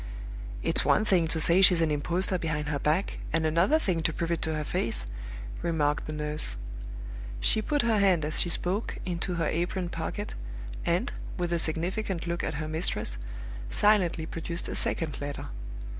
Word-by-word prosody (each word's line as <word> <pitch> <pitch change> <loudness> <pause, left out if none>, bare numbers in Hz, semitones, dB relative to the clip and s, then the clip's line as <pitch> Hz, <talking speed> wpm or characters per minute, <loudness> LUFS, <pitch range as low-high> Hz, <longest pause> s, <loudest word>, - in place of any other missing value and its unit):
"It's - - +4
one 215 - +4
thing 180 -5 +3
to 160 0 +1
say 170 +4 +5
she's 180 -2 +7
an 160 -2 +2
impostor 175 +5 +2
behind 150 -2 -2
her 145 -2 -1
back, 155 +8 0
and 165 -1 +1
another 170 - +4
thing 185 - 0
to 165 - +1
prove 165 +2 -2
it 170 - 0
to 160 0 -1
her 155 - -1
face," 115 - 0 0.6
remarked 150 -3 +1
the - - -3
nurse. 150 - -3 0.8
She 220 - +4
put 290 +5 +1
her 225 -3 +3
hand 185 -6 +4
as 155 - +1
she 175 - 0
spoke 185 +5 0
into 180 0 -2
her 165 - 0
apron 175 +2 -1
pocket, 180 +5 -4 0.5
and, - - +1 0.2
with 175 -1 -1
a 170 - +2
significant 175 +3 +1
look 170 0 -2
at - - -2
her 155 +2 -3
mistress, 155 - -1 0.5
silently 185 - +3
produced 165 +1 -4
a - - -3
second 155 -4 0
letter. 145 0 -4
170 Hz, 175 wpm, -29 LUFS, 155-185 Hz, 0.8 s, she's